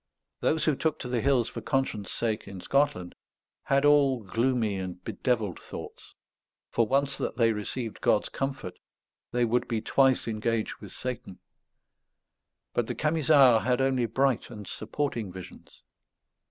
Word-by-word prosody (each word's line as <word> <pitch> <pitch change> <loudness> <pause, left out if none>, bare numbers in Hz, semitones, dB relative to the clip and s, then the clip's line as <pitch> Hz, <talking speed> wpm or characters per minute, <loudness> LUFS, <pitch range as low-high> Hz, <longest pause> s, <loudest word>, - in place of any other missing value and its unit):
Those 155 -1 +1
who 155 - +3
took 160 +2 0
to - - -6
the 125 -2 0
hills 130 -3 +3
for - - -6
conscience' 135 -8 -1
sake 115 -2 -2
in 95 -1 -8
Scotland 90 -7 0 0.5
had 140 +1 +2
all 140 -5 +4
gloomy 115 0 0
and 95 -1 -5
bedevilled 110 -7 -1
thoughts; - - -10 0.6
for 115 - +2
once 140 +2 +1
that - - -3
they 115 -2 +4
received 110 +2 -5
God's 105 - +2
comfort 135 -9 -4 0.5
they 120 0 +2
would 120 +2 +1
be 115 -2 -1
twice 135 +3 +2
engaged 110 0 -1
with 100 -4 -11
Satan; 125 -7 -6 1.4
but 120 -2 0
the - - -3
Camisards 145 -6 +4
had 125 0 +1
only 130 -3 +2
bright 130 +2 +1
and 105 -4 -9
supporting 110 +1 -3
visions. 90 -1 -12
120 Hz, 145 wpm, -28 LUFS, 110-135 Hz, 1.4 s, all